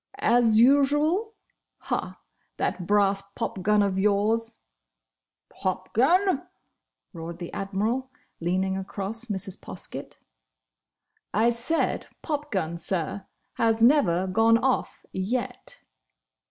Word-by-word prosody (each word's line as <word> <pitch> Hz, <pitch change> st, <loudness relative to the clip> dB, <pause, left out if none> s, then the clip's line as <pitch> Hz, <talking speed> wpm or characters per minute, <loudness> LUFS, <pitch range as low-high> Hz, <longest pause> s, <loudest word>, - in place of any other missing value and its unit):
"As 235 Hz, -, +4 dB
usual!—Ha! 295 Hz, -, +1 dB, 0.4 s
That 175 Hz, -, -2 dB
brass 200 Hz, -1 st, +3 dB
popgun 210 Hz, -2 st, +1 dB
of 195 Hz, -1 st, 0 dB
yours—" 215 Hz, +3 st, +1 dB, 0.9 s
"Popgun!—" 265 Hz, -, +1 dB, 0.7 s
roared 165 Hz, +1 st, -7 dB
the 175 Hz, -1 st, -7 dB
Admiral, 215 Hz, +7 st, -2 dB, 0.3 s
leaning 185 Hz, +3 st, 0 dB
across 200 Hz, +4 st, -4 dB
Mrs. 195 Hz, -4 st, -4 dB
Poskett. -, -, -4 dB, 1.2 s
"I 225 Hz, +3 st, +4 dB
said 240 Hz, +8 st, -1 dB, 0.2 s
popgun, 235 Hz, -, -2 dB
sir!—has 200 Hz, +6 st, -2 dB
never 230 Hz, -, +4 dB
gone 225 Hz, +4 st, +4 dB
off, 260 Hz, +2 st, -1 dB
yet!" 230 Hz, +7 st, -4 dB
215 Hz, 85 wpm, -26 LUFS, 190-250 Hz, 1.2 s, As